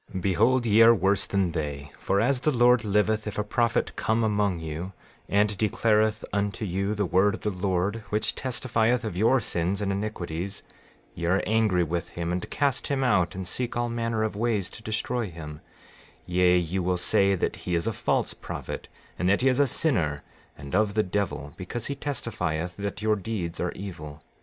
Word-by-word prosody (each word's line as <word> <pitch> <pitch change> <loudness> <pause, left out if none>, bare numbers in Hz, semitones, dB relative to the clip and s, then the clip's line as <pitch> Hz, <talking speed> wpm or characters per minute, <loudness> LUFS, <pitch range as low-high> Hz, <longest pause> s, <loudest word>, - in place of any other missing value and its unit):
13:26 95 - -2
Behold 120 +7 +2
ye 110 0 +5
are 115 +1 +8
worse 100 0 +2
than 95 -3 +1
they; 70 -3 -4
for 100 - +1
as 125 +4 +2
the 155 - +2
Lord 125 -3 +4
liveth, 105 +1 +1
if 105 - -5
a 105 - +1
prophet 115 +2 0
come 115 0 +1
among 105 -4 +1
you 80 +4 -5 0.4
and 105 +1 +2
declareth 110 +1 +1
unto 105 +2 -1
you 100 +3 -1
the 105 -1 0
word 95 +4 +3
of - - -11
the 105 - -1
Lord, 95 +2 -1
which 105 +1 0
testifieth 120 -1 0
of 105 - -4
your 115 +7 +4
sins 90 -2 -1
and 100 -1 -1
iniquities, 100 -2 -4 0.5
ye 85 0 -4
are 95 +3 +2
angry 110 -5 +2
with 85 +1 -3
him, 85 0 -2
and 90 0 -3
cast 140 -2 0
him 135 -1 0
out 90 -10 +2
and 95 -1 -5
seek 120 +6 -3
all 120 0 0
manner 115 -1 -1
of 110 -1 -2
ways 105 -4 0
to - - -10
destroy 110 +1 -2
him; 75 -2 -9 0.6
yea, 90 0 +3
you 90 +2 -1
will 90 0 0
say 100 +2 +3
that 90 - -2
he 90 - -2
is 85 - 0
a 115 - 0
false - - 0
prophet, - - -6 0.3
and 90 - +2
that 100 - +3
he 135 - +3
is 130 +1 +1
a 140 - +5
sinner, 80 - +1 0.3
and 70 -1 -9
of 100 +1 +2
the 110 - +3
devil, 85 -7 -3
because 105 +5 -5
he 140 - -2
testifieth 90 - -3
that 100 +1 -5
your 110 0 +3
deeds 95 -4 -4
are 90 - -1
evil. 80 -6 -8
100 Hz, 195 wpm, -26 LUFS, 90-110 Hz, 0.6 s, are